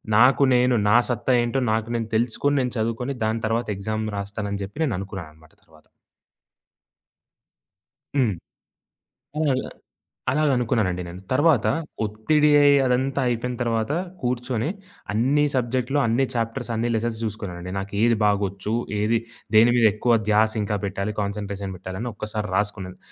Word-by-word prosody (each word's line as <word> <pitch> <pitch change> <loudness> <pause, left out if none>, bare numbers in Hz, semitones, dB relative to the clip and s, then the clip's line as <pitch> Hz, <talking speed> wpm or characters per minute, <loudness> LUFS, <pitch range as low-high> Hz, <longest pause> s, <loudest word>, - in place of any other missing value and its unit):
నాకు 125 +5 +6
నేను, 125 0 +3
నా 110 - +6
సత్తా 125 +1 0
ఏంటో 120 +3 0
నాకు 110 +1 0
నేను 115 -1 -2
తెలుసుకొని, 120 +5 +1
నేను 125 -1 -2
చదువుకొని, 115 +4 -2
దాని 110 +1 -1
తర్వాత 115 +2 -1
ఎక్సామ్ 110 +2 -3
రాస్తాను 100 +1 -4
అని 100 0 -3
జెప్పి 105 +11 -6
నేననుకున్నాననమాట 95 - -5
తరువాత. 80 -1 -22 2.3
హ్మ్. 125 -6 +3 1.1
అలాగ, 145 -4 +2 0.7
అలాగ 155 +3 +1
అలాగనుకున్నానండి 115 -8 0
నేను. 90 +2 -9
తరువాత 145 -2 +3 0.4
ఒత్తిడి 150 +9 +2 0.4
అదంతా 130 +2 +1
అయిపోయిన 120 +1 -1
తరువాత 115 0 0 0.3
కూర్చొని 125 0 -1 0.4
అన్నీసబ్జెక్టులు, 130 +2 +1
అన్నీ 120 +4 +2
చాప్టర్స్, 115 +2 -2
అన్నీ 115 +2 0
లెసన్స్ 110 0 -2
జూసుకున్నానండి. 90 -5 -5
నాకు 100 +1 -6
ఏది 115 0 +4
బాగొచ్చు, 100 0 0 0.3
ఏది 110 +2 +2 0.4
దేని 115 +2 +7
మీద 120 -2 +4
ఎక్కువ 115 +2 +2
ధ్యాసింకా 105 -1 +2
పెట్టాలి, 100 +1 -3
కాన్సన్‌ట్రేషన్ 100 -1 -4
పెట్టాలి 95 +1 -7
అని 120 - -3
ఒక్కసారి 105 -1 -4
రాసుకున్నాను. 100 -3 -2
110 Hz, 125 wpm, -24 LUFS, 100-125 Hz, 2.3 s, దేని